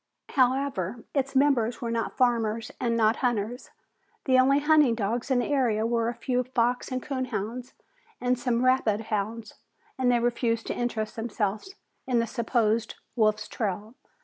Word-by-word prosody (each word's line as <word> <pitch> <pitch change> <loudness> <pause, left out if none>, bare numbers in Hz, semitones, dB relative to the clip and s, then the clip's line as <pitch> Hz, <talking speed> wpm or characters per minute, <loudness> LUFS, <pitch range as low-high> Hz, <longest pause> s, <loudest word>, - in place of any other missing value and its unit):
However, 250 -6 0
its 275 -1 -1
members 260 -4 +2
were 230 -1 -3 0.2
farmers 230 -2 0
and 235 -2 0
not 220 0 +3
hunters. 240 -1 -2 0.6
The 260 -1 +4
only 270 +2 +5
hunting 295 -4 +4
dogs 230 +4 -2
in 260 - +3
the 245 - 0
area 240 -6 +1
were 230 0 +1
a 240 - -5
few 250 -1 -1
fox 245 +1 0
and 255 -1 -3
coon 260 -3 -2
hounds 235 +2 -5 0.4
and 250 0 0
some 245 0 0
rabbit 255 -5 +3
hounds, 215 0 -3 0.5
and 250 -1 +3
they 240 - +3
refused 235 -1 0
to - - -3
interest 230 -3 -2
themselves 225 - -3 0.3
in 250 -2 +1
the 230 - +2
supposed 230 -1 0 0.2
wolf's 215 -2 +1
trail. 210 +1 -4
240 Hz, 155 wpm, -27 LUFS, 220-255 Hz, 0.6 s, only